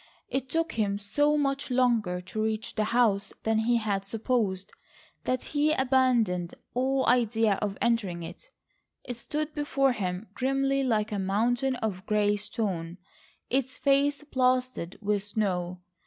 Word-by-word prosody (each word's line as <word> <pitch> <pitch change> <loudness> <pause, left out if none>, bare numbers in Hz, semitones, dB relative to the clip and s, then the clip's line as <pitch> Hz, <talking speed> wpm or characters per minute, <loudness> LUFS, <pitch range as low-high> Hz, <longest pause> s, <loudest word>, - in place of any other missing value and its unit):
It 265 -1 -2
took 325 +2 0
him 205 -3 0
so 290 +9 +2
much 280 0 0
longer 235 -8 +2
to 190 +4 -4
reach 220 0 -2
the 215 -1 0
house 215 -3 +2
than 220 0 +2
he 235 +2 +2
had 205 -3 -1
supposed, 210 -3 -1 0.5
that 255 0 0
he 300 +1 +3
abandoned 250 - +2 0.2
all 265 +2 +1
idea 225 -4 +3
of 205 -2 -2
entering 205 -8 0
it. - - -10 0.5
It 245 - -5
stood 305 +5 -3
before 280 -2 +1
him 190 -3 -3
grimly 270 +2 +1
like 220 -3 +1
a 205 - -1
mountain 235 +7 +1
of 210 -6 -3
grey 210 -1 +2
stone, 190 -5 -3 0.5
its 260 0 0
face 280 +1 +2
plastered 255 - 0
with 205 0 +1
snow. 185 -4 -2
230 Hz, 140 wpm, -28 LUFS, 200-265 Hz, 0.5 s, he